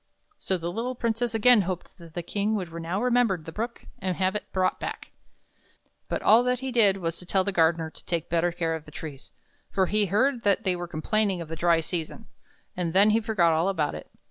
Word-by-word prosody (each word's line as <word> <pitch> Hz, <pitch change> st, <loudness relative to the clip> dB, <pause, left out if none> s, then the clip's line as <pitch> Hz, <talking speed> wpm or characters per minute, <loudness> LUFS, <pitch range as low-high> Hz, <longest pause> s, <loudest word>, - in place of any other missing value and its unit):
So 190 Hz, -, -1 dB
the 170 Hz, 0 st, -4 dB
little 240 Hz, +6 st, -3 dB
Princess 230 Hz, 0 st, -1 dB
again 230 Hz, 0 st, +6 dB
hoped 185 Hz, 0 st, -5 dB
that 165 Hz, -1 st, -14 dB
the 175 Hz, -, -3 dB
King 205 Hz, +4 st, -1 dB
would 180 Hz, -5 st, -4 dB
now 170 Hz, +3 st, -3 dB
remember 245 Hz, -4 st, +2 dB
the 165 Hz, 0 st, -10 dB
Brook 230 Hz, +6 st, -5 dB
and 185 Hz, -2 st, -2 dB
have 190 Hz, +2 st, 0 dB
it 210 Hz, -, -5 dB
brought 185 Hz, -1 st, 0 dB
back. -, -, -6 dB, 1.0 s
But -, -, -2 dB
all 225 Hz, +3 st, +6 dB
that 250 Hz, 0 st, 0 dB
he 265 Hz, 0 st, -3 dB
did 210 Hz, -5 st, +4 dB
was 165 Hz, -3 st, -3 dB
to 180 Hz, -, -7 dB
tell 190 Hz, 0 st, +2 dB
the 200 Hz, -, -1 dB
gardener 165 Hz, -2 st, +2 dB
to -, -, -16 dB
take 170 Hz, -2 st, -2 dB
better 170 Hz, +1 st, +1 dB
care 165 Hz, -1 st, -2 dB
of 160 Hz, -1 st, -6 dB
the -, -, -12 dB
trees, 145 Hz, -3 st, -9 dB, 0.4 s
for 190 Hz, -1 st, +1 dB
he 210 Hz, +2 st, +1 dB
heard 245 Hz, +7 st, +1 dB
that 200 Hz, -3 st, +2 dB
they 185 Hz, -1 st, +1 dB
were 175 Hz, 0 st, -5 dB
complaining 190 Hz, +4 st, 0 dB
of 165 Hz, -2 st, -7 dB
the 165 Hz, -, -4 dB
dry 170 Hz, 0 st, +3 dB
season; 165 Hz, 0 st, -5 dB, 0.5 s
and 175 Hz, -2 st, -2 dB
then 200 Hz, +3 st, +6 dB
he 220 Hz, -, +3 dB
forgot 190 Hz, -7 st, +2 dB
all 165 Hz, +4 st, +2 dB
about 160 Hz, -7 st, -1 dB
it. 75 Hz, -, -9 dB
185 Hz, 225 wpm, -26 LUFS, 165-215 Hz, 1.0 s, again